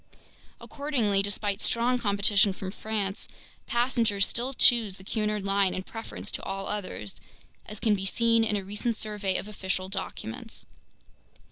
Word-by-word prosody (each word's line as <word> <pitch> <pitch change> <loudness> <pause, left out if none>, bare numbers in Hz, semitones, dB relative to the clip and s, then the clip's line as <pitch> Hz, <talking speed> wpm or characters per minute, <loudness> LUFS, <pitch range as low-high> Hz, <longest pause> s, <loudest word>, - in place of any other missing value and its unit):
Accordingly, 245 -9 0
despite 205 0 -2
strong 245 +2 +2
competition 200 -2 +4
from 190 0 -5
France, 210 -1 -2 0.4
passengers 235 -5 +2
still 255 +3 -1
choose 225 -7 +4
the 190 - -13
Cunard 210 0 -1
line 195 -1 +2
in 185 - -3
preference 225 +3 -7
to - - -2
all 195 0 -4
others, 185 - -5 0.5
as 210 -1 -8
can 220 - +3
be 195 -1 0
seen 230 +2 +3
in 215 -1 +1
a 200 - -1
recent 210 +4 -1
survey 210 -3 -1
of - - -4
official 190 -2 -3
documents. 190 - -4
205 Hz, 145 wpm, -28 LUFS, 195-225 Hz, 0.5 s, competition